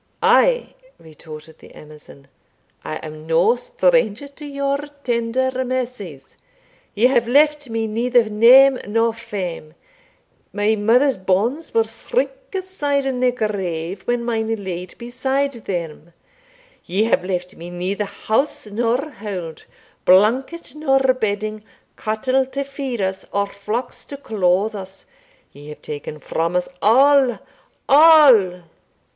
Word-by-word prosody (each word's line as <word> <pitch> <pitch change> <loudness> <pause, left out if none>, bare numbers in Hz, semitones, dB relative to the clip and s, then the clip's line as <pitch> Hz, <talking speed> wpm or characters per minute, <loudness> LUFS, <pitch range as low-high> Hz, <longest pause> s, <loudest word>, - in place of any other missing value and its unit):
"Ay," - - +3 0.2
retorted 155 0 -13
the - - -16
Amazon, 150 -2 -15 0.6
"I 155 - -5
am 155 0 -10
no 165 +8 +3
stranger 245 0 0
to 295 +2 -12
your 280 0 -2 0.2
tender 240 +2 0
mercies. 245 - -5 0.6
Ye 220 - +2
have 245 -3 +3
left 295 +1 +2
me 225 0 -2
neither 235 +3 +2
name 250 +5 +6
nor 225 +2 +1
fame 190 -8 -6 0.8
my 210 +1 +1
mother's 235 +4 +2
bones 210 - -1
will 455 - +4
shrink - - -2 0.2
aside 295 -7 -2
in 260 -2 -2
their 250 0 +3
grave 190 -6 -3
when 240 -1 -1
mine 225 -2 -1
are - - +1
laid 185 -3 -7
beside 265 +4 -2
them 170 -2 -5 0.7
Ye 190 +5 0
have 220 -5 +1
left 180 -1 -4
me 170 +1 -9
neither 185 +4 -3
house 225 +8 -2
nor 235 +6 -1
hold, 190 - -7 0.4
blanket 240 - +2
nor 300 -3 +2 0.2
bedding, 215 -2 -3 0.3
cattle 255 +5 -1
to 275 +1 -4
feed 275 -4 -5
us, 190 0 -3
or 200 0 0
flocks 210 +5 -5
to 280 - -8
clothe 205 -4 0
us 190 -1 -9 0.5
Ye 145 +1 -13
have 150 - -11
taken 150 0 -7
from 165 +3 -3
us 180 - 0
all 265 +2 +4 0.5
all! 270 - +6
225 Hz, 130 wpm, -20 LUFS, 185-265 Hz, 0.8 s, name